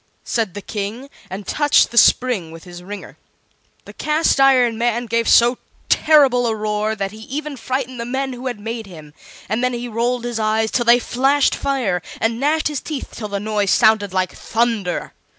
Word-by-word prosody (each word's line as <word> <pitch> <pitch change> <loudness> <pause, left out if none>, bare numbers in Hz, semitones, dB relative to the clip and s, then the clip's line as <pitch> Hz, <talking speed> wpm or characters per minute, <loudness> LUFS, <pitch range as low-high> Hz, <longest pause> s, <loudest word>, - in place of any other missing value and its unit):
said 220 -6 -2
the 205 - -7
King, 225 +6 -5 0.2
and 195 +2 -7
touched 295 +8 +3
the - - -9
spring 235 -10 +4
with 165 0 -12
his 175 -1 -11
ringer. 200 +2 -9 0.7
The - - -12
Cast 305 -1 +1
iron 255 -4 +4
Man 240 +1 0
gave 230 0 0
so 240 +1 +5 0.3
terrible 270 -6 +4
a 225 - 0
roar 215 0 -1
that 195 -2 -3
he 215 - -12
even 290 +6 -5
frightened 255 0 -4
the 235 - -3
men 265 +2 -3
who 250 +1 -6
had 245 -4 -4
made 225 0 -5
him; 155 -5 -12 0.3
and 220 +5 -1
then 250 0 +1
he 240 0 -4
rolled 240 +2 -1
his 240 -1 -3
eyes 220 0 0
till 240 - 0
they 235 +1 +7
flashed 270 +4 +1
fire, 250 -11 -1 0.2
and 225 +1 0
gnashed 305 +3 +1
his 295 -3 -3
teeth 300 -4 -6
till 215 - -6
the 200 -1 -3
noise 210 -1 -1
sounded 215 -2 +3
like 185 -1 -1
thunder. 225 -6 -2
235 Hz, 190 wpm, -19 LUFS, 210-255 Hz, 0.7 s, they